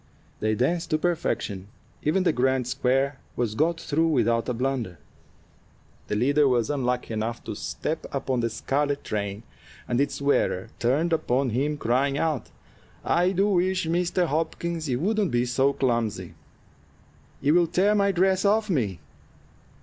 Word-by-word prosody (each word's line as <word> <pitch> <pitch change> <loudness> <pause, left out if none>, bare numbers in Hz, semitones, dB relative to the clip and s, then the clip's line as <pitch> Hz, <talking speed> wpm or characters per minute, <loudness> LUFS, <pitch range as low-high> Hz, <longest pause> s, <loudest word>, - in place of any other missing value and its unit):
They 110 0 +1
danced 165 +9 0
to 155 - +2
perfection; 155 - -2 0.3
even 175 +5 +1
the 180 - +2
"grand 130 0 +1
square" 135 +3 0 0.2
was 120 -3 -1
got 165 +7 +1
through 160 +2 +1
without 120 -6 +1
a - - 0
blunder. 125 -7 -2 1.1
The - - -1
leader 140 +6 +3
was 125 -1 +1
unlucky 125 -4 -1
enough 110 +2 -3
to - - -5
step 160 +1 -4
upon 135 -2 -1
the 115 -1 0
scarlet 140 +5 -1
train, 100 0 -3 0.4
and 120 +2 +1
its 140 0 -1
wearer 130 -7 +1
turned 150 +8 +1
upon 135 -5 +1
him, 145 +6 0
crying 135 +3 +1
out: 155 -5 -1 0.6
"I 180 +2 +3
do 195 +2 +2
wish, 185 -1 +1
Mr. 175 +2 +1
Hopkins, 165 0 -2
you 125 -1 0
wouldn't 205 +3 +1
be 120 0 +1
so 130 +3 +2
clumsy! 120 -5 -1 1.1
You 145 +2 +2
will 175 0 +4
tear 195 +5 +2
my 200 -1 +3
dress 190 +1 +2
off 215 +1 +2
me." 110 - 0
140 Hz, 150 wpm, -25 LUFS, 120-170 Hz, 1.1 s, will